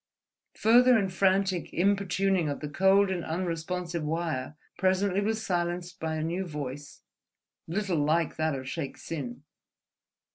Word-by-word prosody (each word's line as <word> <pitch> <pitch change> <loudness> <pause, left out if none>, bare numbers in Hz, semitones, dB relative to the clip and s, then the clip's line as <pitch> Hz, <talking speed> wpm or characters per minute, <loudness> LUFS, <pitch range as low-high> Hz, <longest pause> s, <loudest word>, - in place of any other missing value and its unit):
Further 245 +2 +6
and 195 -4 -1
frantic 190 -1 +1
importuning 195 -2 +2
of 145 - -3
the 150 - -4
cold 190 +5 +4
and 175 -3 -2
unresponsive 170 0 -3
wire 155 -3 -2 0.2
presently 190 +1 +2
was 220 +1 -1
silenced 175 -1 -2
by 160 0 -2
a 155 - -2
new 170 +4 -1
voice, 145 -2 -7 0.6
little 185 -1 -1
like 160 +2 +1
that 155 -2 0
of 130 -1 -6
Shaik 140 0 -4
Tsin. 135 -5 -6
175 Hz, 135 wpm, -28 LUFS, 155-195 Hz, 0.6 s, Further